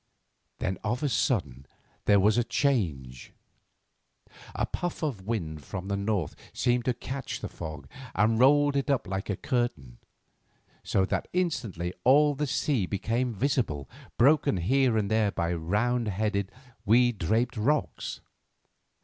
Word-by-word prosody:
Then 95 0 -2
of 120 +6 -1
a 145 - +2
sudden 85 - -1 0.4
there 100 -1 +5
was 105 +2 +4
a - - +3
change. 80 - -1 1.2
A - - 0
puff 175 -1 -4
of 110 -11 -3
wind 80 -10 -3
from 95 +8 -6
the 100 - 0
north 100 -5 -1 0.2
seemed 120 0 +1
to 125 - +1
catch 130 +2 -5
the - - -4
fog 75 -4 -8 0.3
and 110 +3 +3
roll 145 +2 +5
it 140 0 0
up 140 -5 +1
like 95 +1 -4
a 100 - -1
curtain, 80 - -2 0.8
so 95 - +1
that - - -2
instantly 115 - -1
all 145 +3 +5
the 145 +1 -2
sea 130 -6 0
became 115 +5 -1
visible, 110 - -1 0.3
broken 140 -5 +4
here 125 +6 +2
and 105 -1 -1
there 110 -1 +3
by 85 -2 -1
round 105 +8 0
headed, 100 -1 -1 0.3
weed 120 0 +3
draped 115 +9 +1
rocks. 135 +7 -1
110 Hz, 140 wpm, -28 LUFS, 95-130 Hz, 1.2 s, there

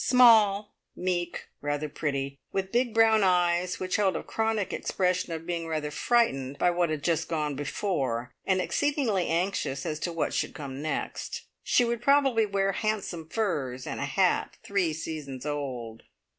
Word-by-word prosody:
Small, 215 -5 +6 0.2
meek, 175 -1 -2 0.2
rather 145 +1 -1
pretty, 140 -2 -3
with 190 0 -2
big 240 0 +2
brown 225 -1 +5
eyes 180 -1 +2
which 185 +2 -1
held 195 -3 +2
a - - -3
chronic 220 -3 -1
expression 180 -1 0
of 165 0 -5
being 170 -1 -3
rather 155 -2 -2
frightened 145 - +1
by 180 - +3
what 175 -1 +1
had 155 -2 -3
just 165 -2 0
gone 150 -3 -1
before, 135 - -2
and 190 -1 +2
exceedingly 255 - +1
anxious 170 -5 -1
as 155 -1 -2
to 175 - -2
what 165 -2 -1
should - - -1
come 140 -2 -6
next. 155 0 -3 0.2
She 245 - +3
would 235 0 -1
probably 270 -5 +4
wear 195 -1 +1
handsome 195 -6 -2
furs, 140 - -2
and - - -4
a - - -1
hat - - +1
three 195 -5 +1
seasons 150 -4 -6
old. 130 -6 -4
175 Hz, 160 wpm, -28 LUFS, 150-210 Hz, 0.2 s, Small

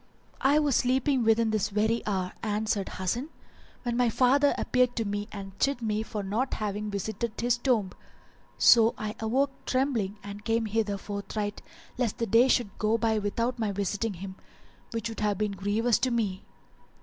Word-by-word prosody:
"I 275 +3 +4
was 295 -4 +3
sleeping 260 +1 +2
within 225 0 +3
this 215 -3 0
very 220 +3 +1
hour," 185 -3 -1
answered 210 -2 -1
Hasan, 235 - -2 0.5
"when 240 -2 -1
my 245 -1 +3
father 270 +5 +3
appeared 250 -1 +1
to 225 - -1
me 205 0 -3
and 195 -1 -7
chid 275 -2 +1
me 215 -2 -1
for 215 -2 -4
not 220 +7 -1
having 210 0 -3
visited 215 +3 -3
his 240 0 +2
tomb; 230 -7 +1 0.7
so 230 -1 +6
I 215 0 -4
awoke 260 +6 +1 0.2
trembling 245 -7 0
and 200 +1 -8
came 225 0 +1
hither 215 -1 0
forthright 205 +1 -4 0.4
lest 235 -5 0
the 230 - 0
day 230 +4 +5
should 240 -6 +1
go 215 +1 +2
by 225 -1 +1
without 230 +4 -1
my 215 -3 0
visiting 200 +2 -2
him, 190 +2 -8 0.5
which 230 -1 -3
would 225 - -6
have 210 -2 0
been 210 0 0
grievous 205 +4 +1
to 255 - +1
me." 210 -5 -1
220 Hz, 175 wpm, -28 LUFS, 205-240 Hz, 0.7 s, so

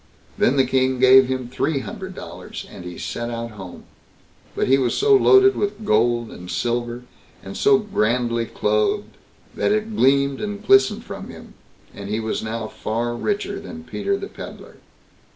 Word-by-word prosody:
Then 130 - +2
the 135 - +4
King 130 0 +1
gave 130 0 +7
him 130 -1 -3
three 135 +3 -1
hundred 190 +6 -8
dollars, - - -8
and - - -11
he 90 -1 -7
set 120 0 -4
out 115 0 -5
home; 95 -4 -10 0.7
but - - 0
he 135 +1 +4
was 125 -3 0
so 420 -1 +5
loaded 395 0 +6
with 205 +1 -3
gold 120 +1 +2
and 90 0 -10
silver, 120 +2 -2 0.4
and 95 - -8
so 205 -1 +4
grandly 120 - 0
clothed, 105 - 0 0.4
that - - 0
it 215 +1 -1
gleamed 140 -2 +3
and 205 0 -5
glistened 205 +2 +4
from - - -8
him, - - -12 0.4
and 100 0 -8
he 105 +1 -1
was 110 0 -2
now 110 0 -4
far 120 +2 -3
richer 200 - -2
than 240 +4 -9
Peter 395 +10 -2
the 395 - -6
Pedlar. - - -11
130 Hz, 170 wpm, -22 LUFS, -, 0.7 s, gave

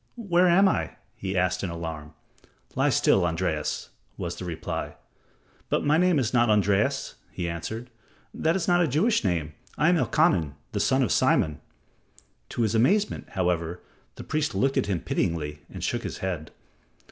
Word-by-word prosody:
"Where 185 -6 +2
am 190 +3 +5
I?" - - -1 0.2
he 95 -1 -3
asked 90 0 +1
in 95 - -1
alarm. 80 -2 -6 0.6
"Lie - - +2
still, 95 - +3
Andreas," 80 -2 -2 0.3
was 85 0 -4
the 90 - -7
reply. 80 -2 -4 0.7
"But - - 0
my 150 +2 +4
name 180 -2 +3
is 130 -3 0
not 120 -2 +4
Andreas," 105 -1 +2 0.2
he 85 - -4
answered. 110 +9 -5 0.4
"That 160 +2 +1
is 190 - -1
not 175 0 +4
a 170 - +3
Jewish 175 - +2
name. 85 -6 -1 0.2
I 150 - +4
am 175 - +4
Elkanan, 150 - +2 0.2
the 105 - -2
son 130 +6 +3
of 110 - 0
Simon." 75 -2 +2 0.9
To 120 - -1
his 110 -1 +1
amazement, 190 - +2
however, 90 -2 -1 0.3
the - - -8
priest 155 -1 -1
looked 135 +1 +1
at 135 - +1
him 95 -5 -1
pityingly 75 -4 -2
and - - -8
shook - - -1
his - - -5
head. 85 -5 -4
105 Hz, 170 wpm, -26 LUFS, -, 0.9 s, am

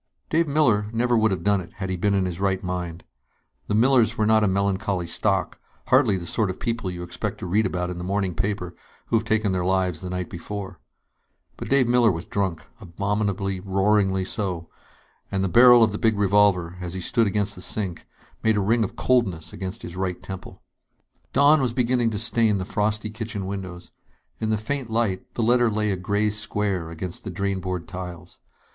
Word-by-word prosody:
_ - - -40
Dave 165 +1 +2
Miller 125 -9 +2
would - - -10
never 120 +1 +2
have 95 - -2
done 100 -1 +2
it, 85 - -12
had 95 -1 -4
he - - -1
been 100 +3 +1
in 95 -1 +1
his 90 -1 -4
right 95 0 0
mind. 90 -2 -4 0.6
The 105 - 0
Millers 120 -1 +4
were 110 - +2
not 110 0 +4
a - - +3
melancholy 95 -1 0
stock, 85 - -1 0.3
hardly 100 - +4
the 85 - -6
sort 105 +3 0
of 95 - -5
people 115 -5 -2
you 90 -1 -6
expect 85 0 -4
to - - -7
read 105 +5 +2
about 90 0 -2
in 90 - -6
the - - -5
morning 95 0 -1
paper 90 0 -2 0.3
who - - -1
have 110 - -2
taken 110 -2 +1
their 90 -1 0
lives 90 -3 0
the 90 - -5
night 90 -1 -3
before. 95 +1 -7 0.8
But - - -7
Dave 135 -3 +4
Miller 120 -2 +4
was 85 -1 -5
drunk 95 -5 -2
abominably, 100 0 -2
roaringly 95 0 +1
so 90 -6 -3 0.6
and 95 -1 0
the - - +1
barrel 120 +4 +7
of 110 - +3
the 105 - -4
big 110 -2 +2
revolver, 100 -3 +3
as 90 0 -5
he - - -3
stood 115 +3 +2
against 105 0 0
the 90 - -8
sink, 95 -3 -4 0.3
made 110 -1 +2
a - - +2
ring 110 +4 +2
of 105 - -4
coldness 95 -11 0
against 95 +3 -6
his 85 - -7
right 90 -1 -2
temple. 95 0 -9 0.7
Dawn 145 +2 +5
was 125 -3 0
beginning 120 -1 +2
to 110 - -3
stain 110 -1 +2
the 95 - -3
frosty 110 +1 -1
kitchen 110 -3 -5
windows. 95 -2 -6 0.5
In 110 - -1
the 110 - +2
faint 125 +3 -3
light, 110 -5 -1
the 120 - 0
letter 120 +1 +4
lay 105 -1 0
a - - 0
gray 100 +3 0
square 105 -5 -1
against 85 +2 -6
the - - -5
drain 100 +1 -2
board 90 -2 -4
tiles. 90 -2 -8
100 Hz, 205 wpm, -24 LUFS, 90-110 Hz, 0.8 s, barrel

